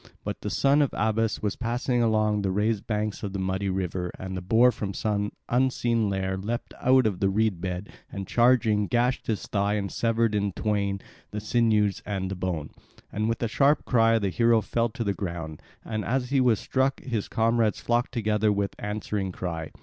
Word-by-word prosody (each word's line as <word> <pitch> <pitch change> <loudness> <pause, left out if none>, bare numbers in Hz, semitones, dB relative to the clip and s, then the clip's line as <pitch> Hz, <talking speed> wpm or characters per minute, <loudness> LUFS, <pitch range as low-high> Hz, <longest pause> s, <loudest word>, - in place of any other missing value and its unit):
But - - -5
the - - -3
son 140 +2 +3
of 140 - 0
Abas 110 +1 0
was 105 - 0
passing 120 +1 -1
along 110 -2 +2
the 100 - 0
raised 105 +2 0
banks 105 -1 -2
of 100 -3 -4
the - - -2
muddy 95 +1 -1
river, 90 -1 -2
and 95 0 -6
the 90 - -4
boar 115 +7 +4
from 100 -4 -5
some 105 -1 -1 0.2
unseen 120 -3 +1
lair 95 -1 -1
leapt 115 +5 -4
out 130 0 +5
of 100 -5 0
the 95 - +2
reed 100 -3 +1
bed, 90 +1 -4 0.2
and 95 -1 -5
charging 115 -3 +3
gashed 120 +3 0
his 110 -3 -1
thigh 100 0 0
and 100 -2 -2
severed 115 -1 +1
in 100 -2 0
twain 100 -2 -1 0.3
the 105 - -4
sinews 105 -2 +2
and 95 -2 -3
the - - -2
bone. 90 -5 -3 0.4
And 110 +2 -1
with 115 - -2
a - - +2
sharp 140 +6 +2
cry 115 -2 +4
the 100 -3 0
hero 115 +3 +3
fell 115 +3 0
to 120 +1 -4
the 100 -2 0
ground; 85 -6 -5 0.2
and 110 -1 -3
as 125 +3 -1
he 135 -2 +3
was 120 -4 +3
struck 135 +1 0
his 115 -6 -3
comrades 115 -1 +1
flocked 120 +1 0
together 110 -3 +1
with 100 -1 -1
answering 105 -2 -3
cry. 85 -3 -4
105 Hz, 195 wpm, -26 LUFS, 100-115 Hz, 0.4 s, out